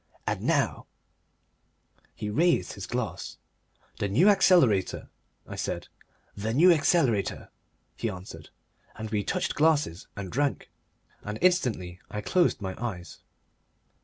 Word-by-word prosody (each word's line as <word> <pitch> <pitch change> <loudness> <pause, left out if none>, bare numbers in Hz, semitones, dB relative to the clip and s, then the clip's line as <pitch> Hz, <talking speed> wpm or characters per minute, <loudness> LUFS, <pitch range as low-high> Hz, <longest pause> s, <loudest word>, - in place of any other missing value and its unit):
And - - -2
now - - 0 0.7
" - - -40
He 105 - -4
raised 170 +10 +2
his 95 -3 -7
glass. 120 0 -4 0.6
"The 100 - 0
New 140 - +4
Accelerator," 170 - +3 0.4
I - - -8
said. - - -4 0.5
"The 110 +3 -3
New 175 +6 +7
Accelerator," 145 - +1 0.5
he 115 - -2
answered, 90 -5 -9 0.5
and 110 0 -6
we 105 -2 0
touched - - -1
glasses 150 - +1
and 95 -3 -6
drank, 140 +2 -1 0.5
and 105 +1 -5
instantly 120 - +1
I 105 - -4
closed 175 - +2
my 95 -1 -3
eyes. 90 -7 -5
110 Hz, 125 wpm, -27 LUFS, 100-160 Hz, 0.7 s, New